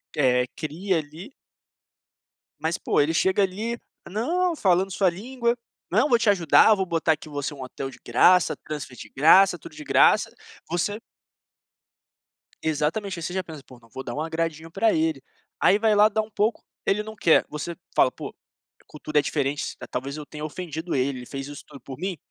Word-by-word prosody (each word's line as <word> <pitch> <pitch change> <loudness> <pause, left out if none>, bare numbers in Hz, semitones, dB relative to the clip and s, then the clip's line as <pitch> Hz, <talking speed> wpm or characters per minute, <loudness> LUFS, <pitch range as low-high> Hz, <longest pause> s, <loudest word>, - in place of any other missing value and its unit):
É, 125 -3 +3
cria 170 +4 -2
ali 160 - -7 1.3
Mas, 160 +1 -1
pô, - - 0
ele 150 +3 +2
chega 190 +4 +2
ali: 215 +5 -2 0.3
"Não", 335 - 0
falando 190 -4 +2
sua 185 0 +2
língua, 235 +6 -2 0.3
"não, 290 - +2
vou 240 -2 +4
te 230 -3 +2
ajudar, 195 +3 +5
vou 190 -1 -1
botar 165 -2 +1
aqui 155 0 -9
você 145 +1 -4
um 135 - -10
hotel 135 +1 -6
de - - -14
graça, 180 +9 +4
transfer 145 -4 -6
de - - -10
graça, 175 +6 +5
tudo 165 0 -12
de 150 - -8
graça", - - +4 0.4
você 205 +5 -1 1.6
Exatamente, 165 +5 -1
aí - - -7
você 175 - -3
já 190 -1 -1
pensa: 155 -4 -10
"Pô, 125 -1 -16
não 115 - -21
vou 130 +5 -7
dar - - -5
um 150 - -2
agradinho 165 0 -3
para 215 +6 +2
ele". 160 -4 0 0.4
Aí, 200 - +5
vai 220 -1 +3
lá 210 +1 +6
dá 220 +1 0
um 215 - -9
pouco, 210 +2 0 0.2
ele 210 +2 +1
não 220 0 -9
quer, 165 - +4
você 150 +3 -5 0.2
fala: 130 - +4
"Pô, - - -7 0.5
a - - -30
cultura 150 0 -1
é - - +3
diferente, 145 0 -2
talvez 135 +4 -4
eu 150 - -7
tenha 150 0 -9
ofendido 160 +1 -5
ele, 130 0 0
ele 125 - -9
fez 135 +1 -6
isso 145 - -9
tudo 140 -2 -13
por 130 -2 -9
mim", 185 -3 -3
165 Hz, 190 wpm, -25 LUFS, 145-200 Hz, 1.6 s, lá